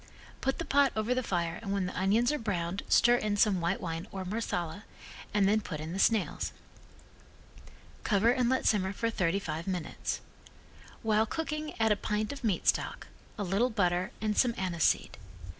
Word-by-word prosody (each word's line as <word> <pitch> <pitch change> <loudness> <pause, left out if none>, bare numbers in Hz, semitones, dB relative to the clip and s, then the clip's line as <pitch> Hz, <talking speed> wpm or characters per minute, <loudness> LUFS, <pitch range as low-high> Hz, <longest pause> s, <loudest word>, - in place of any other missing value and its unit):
Put 270 0 0
the 335 - -4
pot 280 -1 +4
over 215 +3 +1
the 255 - 0
fire 170 -7 -2
and 200 -3 -4
when 200 -2 0
the 180 - -5
onions 215 +7 +2
are 300 - -1
browned 185 -3 -2
stir 240 +1 +5
in 210 -3 -1
some 200 -4 +3
white 170 - 0
wine 165 +2 -4
or 190 -1 -5
Marsala 185 -3 -3 0.5
and 205 -2 +3
then 215 +2 +3
put 155 -7 -6
in 160 +2 -5
the 190 - -3
snails. 220 -1 +1 1.5
Cover 215 +2 +3
and 250 -1 +2
let 260 - +1
simmer 190 -2 +2
for 230 +3 -1
thirty 185 -3 +1
five 170 -3 -4
minutes. 180 -4 -3 0.8
While 220 0 +3
cooking 305 +1 -4
add 220 -1 +3
a - - +5
pint 210 +3 -2
of 275 - -10
meat 205 -6 0
stock, - - 0 0.3
a 205 - -2
little 200 +7 +1
butter 180 -5 +1
and 215 -1 -1
some 240 0 +3
anise 175 -4 0
seed. - - +1
205 Hz, 185 wpm, -30 LUFS, 185-230 Hz, 1.5 s, stir